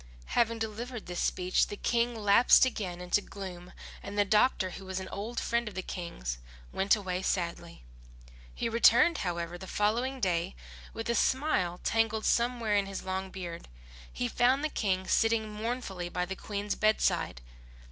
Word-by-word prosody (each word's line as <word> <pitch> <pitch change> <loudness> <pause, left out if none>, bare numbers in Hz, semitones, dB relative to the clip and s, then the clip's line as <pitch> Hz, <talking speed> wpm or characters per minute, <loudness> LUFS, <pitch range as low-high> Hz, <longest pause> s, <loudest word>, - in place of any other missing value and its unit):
Having 230 -1 +2
delivered 225 +2 -5
which 175 0 -4
speech 180 0 +1
the 205 - -6
King 235 +2 +1
lapsed 210 +4 +6
again 190 -8 -3
into 180 +3 +1
gloom, 185 -3 -8 0.3
and 200 +1 -7
the 205 - +4
doctor 210 -2 +3
who 195 - -9
was 190 0 -3
an 190 - -6
old 220 +4 -4
friend 235 0 0
of 210 - -7
the 185 - -3
King's - - -5 0.3
went 195 +4 +3
away 185 -3 -3
sadly. 170 - -3 0.7
He - - -1
returned, 235 +7 +5
however, 170 -1 -3
the 190 - -8
following 240 +8 0
day 180 -3 0 0.4
with 225 - -5
a 235 - +2
smile 235 - +1
tangled 225 -1 +1
somewhere 235 -3 +1
in 200 -1 +2
his 195 -1 -5
long 190 0 -3
beard. 175 -3 -7 0.4
He 90 - -2
found 255 - +2
the 310 - +1
King 190 -7 -1
sitting 225 0 +2
mournfully 210 -5 -4
by 180 0 -1
the 190 +2 -5
Queen's 205 +1 -3
bedside. 215 - +1
205 Hz, 165 wpm, -30 LUFS, 180-230 Hz, 0.7 s, lapsed